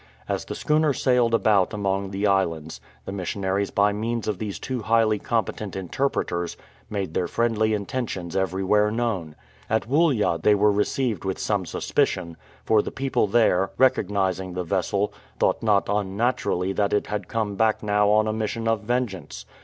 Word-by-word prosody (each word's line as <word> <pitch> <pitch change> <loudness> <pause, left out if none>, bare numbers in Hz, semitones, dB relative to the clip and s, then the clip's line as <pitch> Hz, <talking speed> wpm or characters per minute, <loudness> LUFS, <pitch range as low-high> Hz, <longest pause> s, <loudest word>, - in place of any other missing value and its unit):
As - - -2
the - - -5
schooner 150 -1 +2
sailed 125 -3 +2
about 105 -2 +2
among 100 -1 -1
the 100 +1 -2
islands, 85 -6 0 0.2
the - - -5
missionaries 95 +1 -2
by 100 0 +2
means 115 +2 -2
of 105 -4 -2
these 105 -3 -4
two 130 -3 -4
highly 110 -1 +2
competent 110 -3 -2
interpreters 90 -3 -2 0.3
made 100 -6 -3
their 90 - 0
friendly 110 -2 +1
intentions 100 -5 -4
everywhere 95 +3 +2
known. 105 -9 -2 0.3
At 110 0 0
Woollya 135 - +2
they 105 - +5
were 105 +1 +4
received 105 +1 0
with 95 -1 -2
some 100 -4 -1
suspicion, 85 +1 -1 0.3
for 110 -1 +4
the - - -5
people 135 -5 0
there, 95 -3 +3
recognizing 95 -7 +1
the 90 - -2
vessel, 100 +3 -1 0.2
thought - - +1
not 105 -3 +2
unnaturally 100 -2 0
that 100 0 0
it 105 - +1
had 105 -3 -4
come 110 -3 -2
back 110 +1 +1
now 105 0 +2
on 105 +1 +4
a 110 - 0
mission 110 +1 -2
of 115 -2 +1
vengeance. 110 - -3
105 Hz, 160 wpm, -24 LUFS, 95-115 Hz, 0.3 s, they